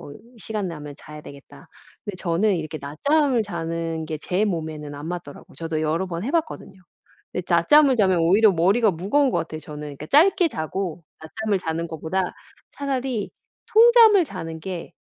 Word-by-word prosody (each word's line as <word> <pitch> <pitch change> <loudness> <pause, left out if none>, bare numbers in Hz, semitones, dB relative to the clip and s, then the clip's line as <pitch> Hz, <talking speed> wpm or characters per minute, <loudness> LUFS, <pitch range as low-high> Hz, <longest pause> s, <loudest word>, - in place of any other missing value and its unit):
뭐 145 - -10 0.3
시간 210 -2 -4
나면 150 -3 -8
자야 150 0 -11
되겠다.' 140 -1 -14 0.4
근데 205 - -5
저는 185 +4 +1
이렇게 155 -2 -4
낮잠을 255 - +1
자는 165 -4 -4
게 155 0 -4
제 180 +6 0
몸에는 155 -6 -4
안 145 +2 -7
맞더라고요. 170 -5 -8
저도 165 -1 -3
여러 160 +4 0
번 170 -1 -5
해 250 - -3
봤거든요. 315 - -3 0.5
이 180 - -2
낮잠을 260 - +5
자면 190 -4 +3
오히려 195 +6 +5
머리가 195 +6 +3
무거운 210 - +1
것 - - +1
같아요, 160 -1 -5
저는. 150 -1 -9 0.2
그러니까 150 - -8
짧게 350 - +4
자고 175 - -4 0.2
낮잠을 205 +5 -2
자는 165 -1 -3
것보다 165 +4 -2 0.5
차라리 260 -6 -3 0.4
통잠을 450 -4 +7
자는 165 - -7
게 180 -2 -6
180 Hz, 355 characters per minute, -23 LUFS, 160-220 Hz, 0.5 s, 통잠을